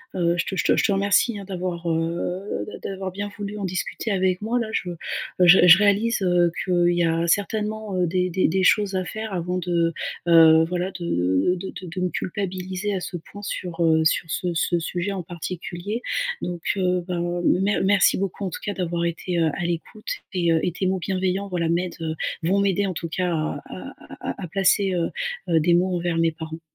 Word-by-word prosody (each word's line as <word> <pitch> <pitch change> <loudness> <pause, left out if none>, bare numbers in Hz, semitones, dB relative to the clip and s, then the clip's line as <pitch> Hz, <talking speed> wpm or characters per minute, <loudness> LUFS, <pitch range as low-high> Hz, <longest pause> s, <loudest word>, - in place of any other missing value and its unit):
heu, 170 -1 +2
je - - 0
te - - -3
je 160 - 0
te - - +3
je - - +1
te 230 - +2
remercie, 200 +3 +2
hein, 200 - -7
d'avoir, 180 -2 -4
heu, 170 - -2
d'a - - -8
d'avoir 190 -1 -4
bien 205 +2 -4
voulu 205 0 -5
en - - -4
discuter 185 +4 -3
avec 185 -1 +1
moi 230 +3 0
là. 230 - -2
Je 180 - -2 0.5
je 180 +1 +8
je 170 0 +10
réalise, 210 +3 +2
heu, 175 -1 +3
qu'il 175 -1 +3
y 175 - +2
a 165 0 +1
certainement, 210 +2 -1
heu, 180 -1 +2
des 180 +1 0
des 185 - +2
des 190 +3 +1
choses 200 +1 +3
à 185 - -1
faire 220 +1 -5
avant 180 +1 -2
de, 170 -1 0 0.3
heu, 160 -1 +7
voilà 180 +1 -2
de 170 - -4 0.5
de 190 - -6
de 185 - -8
de 180 +2 -5
me 180 - +1
culpabiliser 190 +1 -3
à 185 - -3
ce 175 - -5
point 205 +5 -12
sur, 175 -3 -3
heu, 160 0 +4
sur 160 - +2
ce 180 - -1
ce 175 +1 +1
sujet 175 +4 -2
en 190 -2 -3
particulier, 175 +5 -5 0.4
donc 175 -2 -4
heu, 180 -2 +1
ben, 175 0 -2
mer 195 +3 +2
merci 195 -1 +4
beaucoup 195 +1 -3
en - - -1
tout - - -7
cas, 205 - -1
d'avoir 170 -2 -2
été, 170 +1 -2
heu, 165 -1 +3
à - - -3
l'écoute. 175 +5 -4 0.2
Et 175 -2 +2
heu, 160 - +3
et 180 - 0
tes 185 +2 -2
mots 190 0 0
bienveillants, 190 +1 -1
voilà, 170 -2 -1
m'aident, 175 +1 -1
heu, 160 -1 -2 0.3
vont 190 +4 +2
m'aider 200 0 +1
en 185 - -2
tout 165 - -4
cas, 180 +1 -1
à 155 -1 -2
à - - -8 0.3
à - - -5
à 180 - -4
placer, 195 +2 +2
heu 170 -2 0 0.4
heu, 165 -1 +4
des 170 +2 +3
mots 180 +1 +2
envers 170 -1 -1
mes 165 0 +3
parents. 160 0 -8
180 Hz, 220 wpm, -23 LUFS, 170-195 Hz, 0.5 s, je